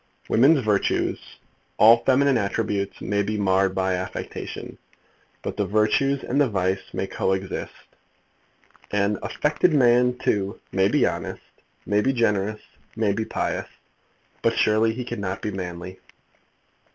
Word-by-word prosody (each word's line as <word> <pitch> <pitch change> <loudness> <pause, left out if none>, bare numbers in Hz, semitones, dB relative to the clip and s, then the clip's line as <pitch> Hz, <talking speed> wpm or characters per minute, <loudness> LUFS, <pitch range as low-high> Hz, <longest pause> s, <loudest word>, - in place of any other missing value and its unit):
Women's 135 +2 +4
virtues, 105 -2 +1 0.6
all 115 +2 +7
feminine 135 +1 +3
attributes, 100 -1 -2
may 100 0 0
be 105 +1 -2
marred 95 -1 +2
by 95 0 0
affectation, 90 +1 -6 0.6
but - - -5
the 100 - 0
virtues 110 +7 +1
and 140 +4 +1
the 140 - +3
vice 95 -1 0
may - - -2
co 95 - -1
exist. 95 0 -5 1.0
An 100 0 0
affected 155 +2 +1
man, 125 -1 +4
too, 100 -2 -1
may 95 0 +3
be - - +3
honest, - - -4 0.4
may 105 0 +2
be 135 +5 +1
generous, 105 -3 0 0.3
may 110 -2 +1
be 110 +2 -2
pious; - - -3 0.7
but - - +1
surely 110 +1 +3
he 125 +2 -5
cannot 100 -4 -4
be 105 - -2
manly. 90 -1 -6
105 Hz, 135 wpm, -24 LUFS, 95-120 Hz, 1.0 s, all